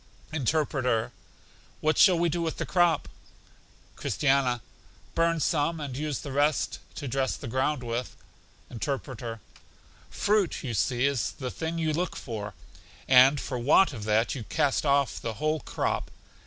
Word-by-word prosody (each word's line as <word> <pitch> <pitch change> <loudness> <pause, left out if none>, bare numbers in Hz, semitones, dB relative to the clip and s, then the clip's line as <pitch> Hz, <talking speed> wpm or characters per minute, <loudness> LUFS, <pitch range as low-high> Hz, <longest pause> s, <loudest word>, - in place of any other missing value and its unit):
Interpreter: 130 -5 0 0.7
What 155 +1 +2
shall 185 -4 +7
we 170 +1 +2
do 170 +1 -1
with 165 -1 -2
the - - -2
crop? 175 -4 +2 0.9
Christiana: 135 -4 +1 0.5
Burn 165 0 +2
some, 160 +1 +1
and 140 -4 -5
use 150 -1 -3
the 140 - -6
rest 145 +2 +1 0.2
to 140 - -5
dress 130 +1 0
the 140 - -8
ground 130 +3 0
with. 120 +1 -3 0.6
Interpreter: 120 -3 -4 0.7
Fruit, 205 -3 +1
you 125 -4 -3
see, 120 +4 +1
is 140 -4 0
the 130 -2 -5
thing 165 +1 -4
you 160 -2 0
look 175 +3 -1
for, 105 -4 -6 0.5
and 130 +2 +7
for 125 -1 -4
want 145 +7 +4
of 110 -4 -6
that 110 +2 +2
you 130 - -5
cast 145 +1 +1
off 140 -2 +2
the 115 -1 -4
whole 155 +7 0
crop. - - -2
140 Hz, 150 wpm, -27 LUFS, 125-155 Hz, 0.9 s, shall